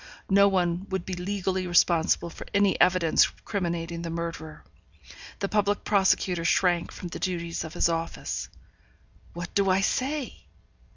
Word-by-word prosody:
No 200 +1 +6
one 180 -1 0
would 190 -2 -3
be 190 - -5
legally 185 0 -2
responsible 170 -1 +3
for - - -10
any 200 -2 +4
evidence 180 -3 +4 0.2
criminating 170 -4 -3
the 170 - -5
murderer. 165 -2 -6 0.7
The 200 - -2
public 205 0 0
prosecutor 190 -3 +2
shrank 175 0 +2
from 175 - -7
the - - -7
duties 170 -3 -3
of 160 - -8
his - - +3
office. 165 0 -3 0.8
What 175 +1 -7
do 200 -1 +2
I 185 +1 +3
say? 270 +6 -2
180 Hz, 140 wpm, -26 LUFS, 170-195 Hz, 0.8 s, No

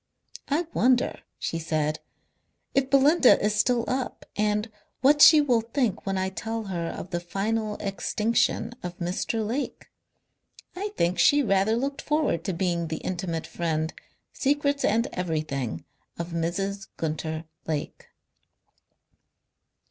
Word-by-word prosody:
"I 310 +5 +1
wonder," 250 0 +2 0.2
she 165 - -3
said, 155 -1 -1 0.7
"if 270 -1 +2
Belinda 275 +1 +6
is 210 +1 +1
still 235 +3 +2
up, 255 0 -3
And 210 +1 0 0.3
what 290 +3 +5
she 310 0 +10
will 245 -6 +3
think 230 -3 -1
when 195 0 0
I 190 0 0
tell 225 +3 -4
her 175 -4 -3
of 180 - -6
the 175 - -1
final 210 +4 -2
extinction 215 +3 0
of 180 0 -6
Mr. 185 +5 -2
Lake. 255 +6 -4 0.8
I 400 +3 -3
think 175 +1 +1
she 290 +10 +5
rather 195 0 +2
looked 275 +3 -2
forward 295 - 0
to 195 - 0
being 170 -1 -1
the 160 0 -3
intimate 175 -3 -3
friend, 160 -2 -2 0.4
secrets 285 0 +1
and 225 +3 +2
everything, 155 - -3 0.3
of 170 0 -4
Mrs. 190 +4 -2
Gunter 160 0 -3 0.2
Lake." 155 -2 -4
200 Hz, 130 wpm, -26 LUFS, 170-250 Hz, 0.8 s, she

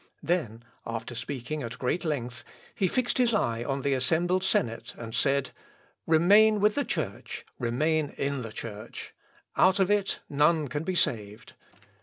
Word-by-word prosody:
Then, 145 -9 -1 0.2
after 115 +1 -5
speaking 130 +4 -4
at 120 -2 -6
great 135 +7 -1
length, 125 -7 -3 0.3
he 190 - +1
fixed 250 +6 0
his 235 -3 +3
eye 115 - 0
on 135 +1 -2
the 140 - +2
assembled 170 +8 +1
senate, 115 -11 -1
and 115 -1 -7
said, 140 +2 +1 0.6
"Remain 205 +7 +6
with 210 +1 +4
the 285 - 0
Church, - - -4
remain 150 +5 +1
in 140 -1 -1
the 115 -2 -6
Church. 110 0 -8 0.4
Out 190 +1 +5
of 190 +1 +3
it 205 -1 +1
none 150 +1 +2
can 145 +2 -3
be 185 +2 -2
saved. 110 -8 -1
145 Hz, 155 wpm, -28 LUFS, 120-180 Hz, 0.6 s, Remain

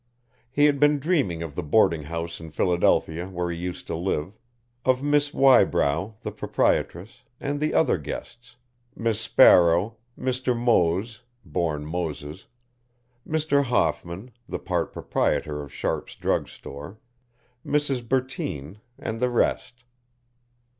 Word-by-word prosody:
He 145 +3 +3
had 145 -2 +3
been 145 +1 +5
dreaming 135 - 0
of 80 -3 -7
the 90 - -3
boarding 85 0 +3
house 85 +2 -5
in 80 -1 -9
Philadelphia 85 0 +1
where 90 -2 -3
he 85 - -4
used 90 0 -5
to - - -4
live, 85 +1 -2 0.5
of 130 +1 +2
Miss 145 0 +2
Wybrow, 110 - +3
the - - -4
proprietress, 90 +7 -1 0.2
and 145 0 -2
the 155 +1 0
other 140 - +3
guests, 120 - -8 0.4
Miss 115 -2 0
Sparrow, 90 +1 +5 0.2
Mr. 130 -1 -1
Moese 110 -1 +1 0.2
born 80 -4 -2
Moses 80 0 -5 0.8
Mr. 150 -3 +2
Hoffman, 110 -3 -1 0.2
the - - -2
part - - -2
proprietor 75 -1 -1
of 70 -2 -10
Sharpes' - - -3
Drug - - 0
Store, 75 +9 -10 0.7
Mrs. 135 -5 -1
Bertine, 105 - -2 0.2
and 110 0 -5
the 125 +1 +2
rest. 120 +1 -1
100 Hz, 125 wpm, -25 LUFS, 85-130 Hz, 0.8 s, been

